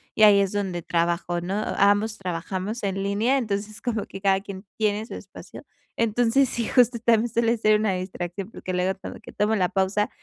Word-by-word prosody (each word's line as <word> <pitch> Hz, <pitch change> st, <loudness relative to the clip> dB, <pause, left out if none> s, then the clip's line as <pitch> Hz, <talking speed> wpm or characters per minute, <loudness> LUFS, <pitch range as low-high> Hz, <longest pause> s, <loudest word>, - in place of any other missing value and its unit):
y 215 Hz, -, +4 dB
ahí 205 Hz, -1 st, +8 dB
es 195 Hz, -, 0 dB
donde 190 Hz, -4 st, -2 dB
trabajo, 170 Hz, +1 st, -1 dB
¿no? 185 Hz, +3 st, -3 dB, 0.2 s
Ambos 205 Hz, +2 st, +3 dB
trabajamos 185 Hz, +5 st, -4 dB
en 195 Hz, -1 st, -1 dB
línea, 215 Hz, +7 st, +1 dB
entonces, 215 Hz, -1 st, -3 dB
como 230 Hz, -4 st, -2 dB
que 195 Hz, -, -9 dB
cada 195 Hz, -1 st, +3 dB
quien 195 Hz, 0 st, -9 dB
tiene 215 Hz, 0 st, 0 dB
su -, -, -10 dB
espacio. -, -, -11 dB, 0.3 s
Entonces, 235 Hz, +3 st, +2 dB
sí, 235 Hz, -2 st, -2 dB
justo, 245 Hz, -2 st, +4 dB
también 235 Hz, 0 st, +3 dB
suele 230 Hz, +1 st, +1 dB
ser 215 Hz, -1 st, +3 dB
una 210 Hz, -3 st, +1 dB
distracción, 185 Hz, +2 st, -5 dB
porque 185 Hz, -, -6 dB
luego 185 Hz, +1 st, 0 dB
como -, -, -8 dB
que -, -, -12 dB
tomo 210 Hz, +2 st, +1 dB
la 180 Hz, -3 st, +1 dB
pausa 195 Hz, +2 st, 0 dB
205 Hz, 195 wpm, -24 LUFS, 190-220 Hz, 0.3 s, ahí